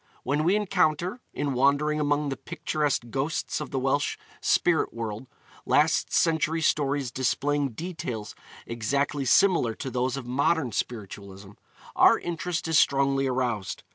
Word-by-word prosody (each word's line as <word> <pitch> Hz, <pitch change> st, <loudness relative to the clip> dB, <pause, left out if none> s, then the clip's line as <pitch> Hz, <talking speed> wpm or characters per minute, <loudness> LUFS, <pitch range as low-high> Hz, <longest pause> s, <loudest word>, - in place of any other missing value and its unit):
When 145 Hz, +4 st, 0 dB
we 180 Hz, +5 st, +3 dB
encounter, 185 Hz, 0 st, 0 dB
in 145 Hz, -2 st, -2 dB
wandering 140 Hz, +4 st, +2 dB
among 145 Hz, 0 st, 0 dB
the 135 Hz, -, -2 dB
picturesque 150 Hz, -3 st, -2 dB
ghosts 150 Hz, +5 st, -2 dB
of 150 Hz, -, -5 dB
the -, -, -3 dB
Welsh 135 Hz, +2 st, 0 dB, 0.2 s
spirit 175 Hz, -2 st, +2 dB
world, 115 Hz, +1 st, -5 dB, 0.4 s
last -, -, +2 dB
century 160 Hz, -1 st, +1 dB
stories 140 Hz, -3 st, +1 dB
displaying 140 Hz, +1 st, 0 dB
details 120 Hz, -, -5 dB, 0.3 s
exactly 140 Hz, +5 st, -1 dB
similar 165 Hz, -, +3 dB
to 130 Hz, -, -6 dB
those 130 Hz, +1 st, -1 dB
of 135 Hz, -, -6 dB
modern 135 Hz, +2 st, +1 dB
spiritualism, 100 Hz, -3 st, -6 dB, 0.4 s
our -, -, +6 dB
interest 170 Hz, 0 st, -3 dB
is 160 Hz, -1 st, +4 dB
strongly 135 Hz, 0 st, +2 dB
aroused. 125 Hz, -6 st, -2 dB
140 Hz, 135 wpm, -26 LUFS, 125-155 Hz, 0.4 s, our